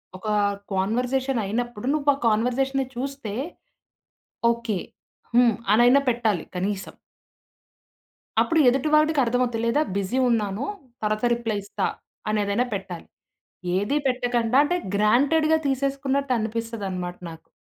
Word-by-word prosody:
ఒక 190 +4 -8 0.5
కాన్వర్జేషన్ 250 +6 0
అయినప్పుడు 240 +2 -3
నువ్వు 295 -1 +1
ఆ - - -11
కాన్వర్జేషన్‌ని 255 +5 +1
చూస్తే 265 -4 -4 1.2
ఓకే. 230 -5 -2 0.6
హ్మ్. 240 -3 +5 0.2
అనయినా 245 +5 +6
పెట్టాలి 225 -6 0
కనీసం. 195 +2 -3 1.5
అప్పుడు 330 -2 +2
ఎదుటి 270 +4 0
వాడికర్థమవుద్ది. 250 -6 +2
లేదా 235 +6 +2 0.2
"బిజీ 200 +6 -1
ఉన్నాను. 215 0 0 0.4
తరువాత 215 +2 0
రిప్లై 230 -3 -2
ఇస్తా." 200 - -3 0.4
అనేదైనా 210 +2 +1
పెట్టాలి. 190 -4 -6 0.7
ఏది 205 +9 0
పెట్టకండ 245 -2 0
అంటే 350 +4 0 0.2
గ్రాంటెడ్‌గా 285 +10 +3
తీసేసుకున్నట్టు 275 0 0
అనిపిస్తదన్నమాట 210 -5 -4
నాకు. 160 - -14
235 Hz, 100 wpm, -24 LUFS, 210-270 Hz, 1.5 s, అనయినా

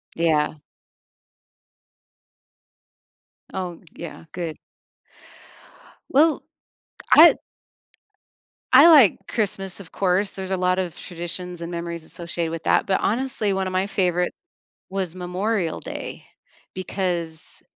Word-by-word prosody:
Yeah. 155 -2 +1 2.9
Oh, 180 -3 -4 0.2
yeah, 170 0 -9
good. 170 -3 -5 1.5
Well, 305 +3 +4 0.7
I - - +9 1.4
I 285 +6 +10
like 285 - +7
Christmas, 195 -4 -2
of 190 -4 -12
course 195 +1 +1
there's 190 -1 -6
a 190 - +1
lot 180 0 +1
of 180 -3 -3
traditions 175 0 -6
and 170 - -5
memories 170 -1 -5
associated 170 0 -4
with 165 0 -5
that, - - +3
but, 190 - +1
honestly, 225 -2 0
one 190 0 -1
of 185 - -4
my 185 +1 +1
favorite 180 -3 0 0.6
was 185 -3 -2
Memorial 185 +1 -2
Day - - -7 0.5
because 175 -4 -3
180 Hz, 105 wpm, -23 LUFS, 170-195 Hz, 2.9 s, I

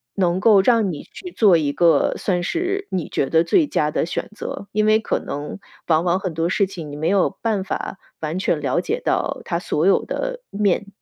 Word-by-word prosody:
能 180 -1 +1
够 205 -1 +6
让 225 -4 +3
你 150 - -7
去 360 - -10
做 205 - +5
一 145 -3 0
个 170 +1 +3
算 180 -3 -1
是 370 - -2
你 180 -4 -2
觉 135 - -1
得 165 0 +4
最 310 - +3
佳 150 - 0
的 - - 0
选 - - -3
择。 200 - -6
因 215 +1 +1
为 215 0 +5
可 - - -1
能 145 +6 -6 0.3
往 160 0 +3
往 175 +1 +1
很 185 -4 -4
多 165 +2 -1
事 200 - +2
情 175 -6 -8
你 - - -7
没 155 +2 -2
有 195 -1 +3
办 215 -4 0
法 190 0 -5 0.2
完 155 +3 -2
全 - - 0
了 - - 0
解 475 - -2
到 - - -1
它 170 -1 -1
所 160 -2 -1
有 195 - +4
的 - - -4
面。 200 -1 0
190 Hz, 235 characters per minute, -21 LUFS, 165-215 Hz, 0.3 s, 够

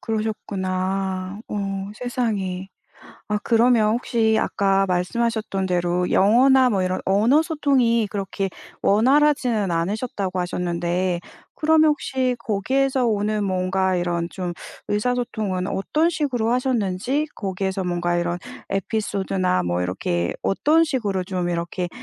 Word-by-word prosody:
그러셨구나. 190 -3 -2
어 195 -1 -3
세상에. 210 -6 -2 0.6
아 210 0 0
그러면 230 -2 +4
혹시 225 -2 +1
아까 195 -1 +2
말씀하셨던 195 +2 -1
대로 180 0 0
영어나 255 +6 +5
뭐 195 -4 +1
이런 185 0 -1
언어 225 +11 +4
소통이 265 - +2
그렇게 195 -1 -3 0.3
원활하지는 245 -2 +3
않으셨다고 190 +2 -2
하셨는데 175 0 -1 0.3
그러면 315 0 +4
혹시 260 -3 -1
거기에서 255 +5 0
오는 210 -1 0
뭔가 185 0 0
이런 175 -1 -1
좀 180 -1 -4 0.4
의사소통은 210 -4 -1
어떤 305 - +1
식으로 260 -8 -1
하셨는지 250 +2 0
거기에서 190 -1 -3
뭔가 175 -1 0
이런 175 0 -1 0.3
에피소드나 195 - -1
뭐 90 0 -1
이렇게 90 -1 -1
어떤 310 +11 +3
식으로 210 - -1
좀 180 -2 -2
이렇게 175 +1 -2
200 Hz, 295 characters per minute, -22 LUFS, 185-240 Hz, 0.6 s, 영어나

